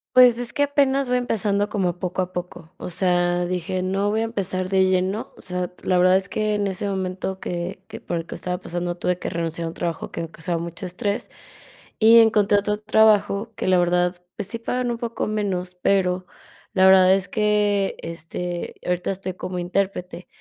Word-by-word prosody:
Pues, 245 -2 +7
es 245 +1 -3
que 285 - +1
apenas 275 -2 +2
voy 250 - +3
empezando 205 -3 0
como 180 -4 -1
poco 185 0 -2
a 185 - -8
poco. 175 -2 -7
O - - -6
sea, 175 0 +1
dije: 185 +1 -2
"No 195 +2 0
voy 220 +1 0
a - - +1
empezar 190 -4 -2
de 190 -1 +4
lleno". 185 +3 0
O - - -14
sea, 180 -1 -3
la 185 - +2
verdad 185 +1 +5
es 190 0 +1
que 215 +1 -1
en 205 -1 0
ese 195 +1 -2
momento 190 0 -3
que 180 +2 -5
que - - -9
por 175 - -3
el 165 - -4
que - - -8
estaba 180 0 -3
pasando 175 -1 -4
tuve 180 0 -1
que - - -3
renunciar 165 0 -3
a - - -2
un - - -8
trabajo 170 -2 -3
que - - -4
me 165 0 -6
causaba 170 +1 -3
mucho 170 +3 -6
estrés, 200 +5 -3 0.7
y 230 +1 +8
encontré 210 -2 +4
otro 210 +1 -2
trabajo 220 0 +3
que - - -3
la 185 -1 +4
verdad, 175 0 +2 0.2
pues 200 -3 -3
sí 230 - -3
pagan 245 +1 -2
un 235 - -3
poco 230 -2 -3
menos, 190 -4 -2
pero 185 0 +1 0.5
la 190 0 +4
verdad 190 0 +7
es 195 -1 +1
que, 210 -3 +1
este, 170 +1 -5
ahorita 180 +1 -1
estoy 190 -1 -4
como 180 -1 -5
intérprete. 180 -1 -2
185 Hz, 205 wpm, -23 LUFS, 180-210 Hz, 0.7 s, y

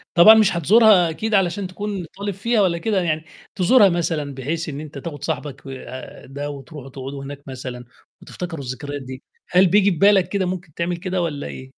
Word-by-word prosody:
طبعًا 210 +6 +9
مش 215 -5 +4
هتزورها 195 0 +5
أكيد 215 +7 -3
علشان 190 0 +1
تكون 195 -1 -5
طالب 200 0 -3
فيها 215 +3 +1
والَّا 175 -3 +2
كده 200 0 0
يعني، 160 -2 -1 0.3
تزورها 200 +2 +5
مثلًا 160 -5 -2
بحيث 155 +5 -3
إن 140 0 -6
أنت 150 -2 -9
تاخد 145 -1 -7
صاحبك 145 -1 -5
آآ، 130 -1 -9
ده 145 +2 -6
وتروحوا 140 0 -9
تقعدوا 135 +1 -7
هناك 140 0 -8
مثلًا، 125 -2 -7 0.4
وتفتكروا 165 -5 -7
الذكريات 140 +3 -5
دي، 130 0 -9 0.3
هل 180 +1 +5
بييجي 200 +2 +4
في 170 - -3
بالك 195 -1 +4
كده 195 -1 0
ممكن 180 -4 -5
تعمل 170 +1 -2
كده 185 0 -2
والَّا 150 -4 -3
إيه؟ 130 - -8
170 Hz, 190 wpm, -21 LUFS, 140-190 Hz, 0.4 s, طبعًا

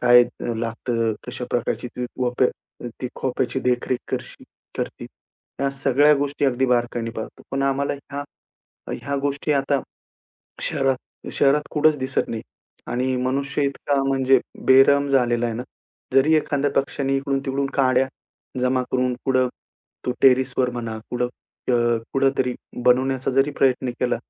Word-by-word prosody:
काय 120 0 +7
अ, 120 0 -5
लागतं, 115 0 -1
कशा 125 - -5
प्रकारची 120 0 -1
ती 125 0 -2
वप्या 125 0 -1
ती 125 - -2
खोप्याची 130 0 -1
देखरेख 125 0 0
करशी - - -5 0.3
करती, - - -4 0.5
ह्या 140 +1 +1
सगळ्या 140 +2 +4
गोष्टी 145 0 -1
अगदी 130 -1 +2
बारकाईने 120 -1 0
पाहतो. 110 - -7
पण 135 0 -1
आम्हाला 140 +1 +1
ह्या, 140 0 -7 0.7
ह्या 140 0 -3
गोष्टी 145 +1 0
आता 140 0 +1 0.8
शहरात 135 -1 +1 0.4
शहरात 145 +1 +3
कुठेच 155 0 +3
दिसत 130 +1 -1
नाही 115 -1 -4 0.5
आणि 130 +1 0
मनुष्य 140 +3 -1
इतका 140 0 0
म्हणजे 135 -1 +4 0.3
बेरहम 140 +2 +6
झालेला 120 -3 +2
आहे 115 - -2
ना. 120 - -3 0.5
जरी 145 +4 +5
एखाद्या 145 -2 +1
पक्षाने 135 0 -2
इकडून-तिकडून 135 0 -1
काड्या 130 -1 +3 0.5
जमा 125 0 +2
करून 125 -1 +1
कुठं 130 -1 +3 0.6
तो 125 - +1
टेरेसवर 130 -1 +4
म्हणा, 115 -2 -4
कुठं 125 0 0 0.4
अ, 120 -1 +3
कुठेतरी 135 -2 +1 0.3
बनवण्याचा 130 +1 +3
जरी 135 +2 +3
प्रयत्न 130 -1 +2
केला, 125 -1 +1
130 Hz, 135 wpm, -23 LUFS, 125-140 Hz, 0.8 s, काय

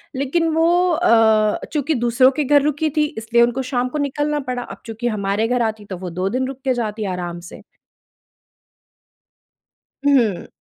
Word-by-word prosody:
लेकिन 280 +5 0
वो 325 +1 +3 0.2
अ, 220 -7 +3
चूँकि 300 +1 0
दूसरों 240 +1 +3
के 300 +2 -1
घर 285 +1 +4
रुकी 300 +2 0
थी 305 - +4
इसलिए 225 +1 +1
उनको 240 +2 0
शाम 250 -1 -1
को 300 - -4
निकलना 295 +1 -1
पड़ा। 250 -1 -2
अब - - -11
चूँकि 225 +1 -4
हमारे 210 0 -1
घर 245 0 0
आती 220 -2 -2
तो 190 -2 -7
वो 180 0 -6
2 185 +3 -2
दिन 255 +4 -1
रुक 270 0 -7
के 260 - +2
जाती 220 -3 -3
आराम 175 -1 -5
से। - - -12 2.5
हुँ। 240 -10 +2
245 Hz, 170 wpm, -20 LUFS, 215-280 Hz, 2.5 s, घर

